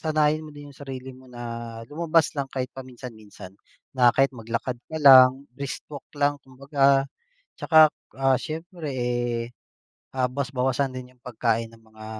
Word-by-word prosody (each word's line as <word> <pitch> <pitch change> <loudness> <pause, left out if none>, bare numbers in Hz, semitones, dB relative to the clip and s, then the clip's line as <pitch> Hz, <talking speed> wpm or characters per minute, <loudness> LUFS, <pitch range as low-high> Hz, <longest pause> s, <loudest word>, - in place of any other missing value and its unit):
sanayin 155 0 +1
mo 155 - -10
din 145 0 -11
yung - - -21
sarili 130 -2 -8
mo 130 +1 -16
na 115 -1 -7
lumabas 160 0 +1
lang 135 -1 -2
kahit 130 -1 -4
paminsan-minsan 115 -7 -11 0.4
na 125 -2 +5
kahit 135 0 +3
maglakad 115 +1 -4
ka 160 - -6
lang, 130 0 +8
brisk 140 +2 -6
walk 140 - -8
lang 145 0 +1
kumbaga. 135 +1 +1 0.5
Tsaka, 155 -2 +6 0.3
ah, 135 -1 +4
siyempre, 160 -1 -6
eh, 120 -2 -2 0.6
ah, 130 -1 +2
bawas-bawasan 135 0 -1
din 125 0 -9
yung 125 - -37
pagkain 115 -2 -1
ng 115 - -18
mga 110 0 -14
130 Hz, 150 wpm, -25 LUFS, 120-145 Hz, 0.6 s, lang